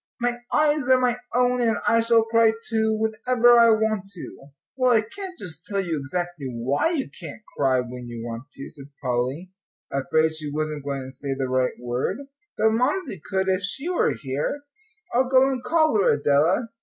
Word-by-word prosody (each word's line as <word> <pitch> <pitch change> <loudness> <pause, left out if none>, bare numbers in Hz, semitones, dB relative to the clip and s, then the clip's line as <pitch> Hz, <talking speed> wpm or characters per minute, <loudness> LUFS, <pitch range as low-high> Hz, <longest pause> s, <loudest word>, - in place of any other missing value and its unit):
"My 240 0 -1
eyes 300 -3 +2
are 260 0 +6
my 245 -1 +1 0.2
own, 250 0 +2
and 225 -3 +2
I 230 0 +4
shall 230 0 +4
cry, 225 0 +3
too, 220 -1 +1
whenever 235 +2 +3
I 230 0 +7
want 220 -3 +1
to." 140 -5 -10 0.3
"Well, 255 -1 +2
I 220 - +5
can't 370 - -8
just 165 - -6
tell 200 -1 -1
you 175 -4 -1
exactly 175 +1 -4
why 125 - 0
you 315 -6 -1
can't 220 - -8
cry 130 -2 +2
when 125 0 -8
you 120 -1 -7
want 120 +4 -7
to," 135 - -8
said 140 -2 -8
Polly, 130 +7 -2 0.4
afraid 155 +3 +1
she 155 -2 -5
wasn't 155 -1 -3
going 140 -1 -3
to 130 - -9
say 135 +1 -4
the 135 -1 -2
right 130 0 0
word, 120 +1 -2 0.4
"but 220 +1 +3
Mamsie 250 - -1
could 190 0 -1
if 190 0 +1
she 270 - -3
were 360 - +1
here. 145 - -3 0.5
I'll 255 +1 +2
go 260 0 +5
and 265 -2 -2
call 315 -10 +3
her, - - +4
Adela." 150 - +2
195 Hz, 190 wpm, -24 LUFS, -, 0.5 s, I